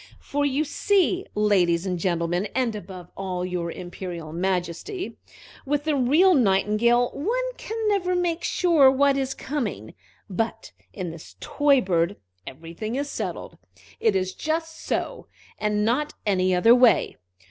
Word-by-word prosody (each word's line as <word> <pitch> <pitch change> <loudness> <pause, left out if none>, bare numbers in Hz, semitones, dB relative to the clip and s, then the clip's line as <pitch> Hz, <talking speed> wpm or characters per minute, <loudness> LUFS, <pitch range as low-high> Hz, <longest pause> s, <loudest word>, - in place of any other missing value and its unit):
"For 285 0 -1
you 280 +2 0
see, 380 +3 +1
ladies 190 -5 +2
and 180 -2 -2
gentlemen, 175 +2 0
and 250 -4 0
above 185 -3 -9
all, 180 -2 -3
your 180 -2 -3
Imperial 175 -3 -7
Majesty, 185 - -3 0.4
with 290 +1 -1
the 310 -1 0
real 300 +9 +4
Nightingale 235 - +3
one - - -2
can 445 - -6
never 370 -3 +1
make 350 -1 -1
sure 325 -7 +4
what 275 +1 +3
is 270 -1 -2
coming, 220 - -4 0.3
but 225 +3 -3 0.2
in 180 -4 -5
this 165 -1 -12
toy 285 -3 +2
bird 175 -1 0 0.3
everything 165 - -6
is 285 +1 -3
settled. - - -5 0.4
It 220 -3 +2
is 185 0 -1
just 320 +1 -3
so, - - -3 0.3
and 210 0 0
not 260 +7 0
any 185 -2 +2
other 225 +6 +6
way. 245 -1 +4
225 Hz, 140 wpm, -24 LUFS, 180-290 Hz, 0.4 s, other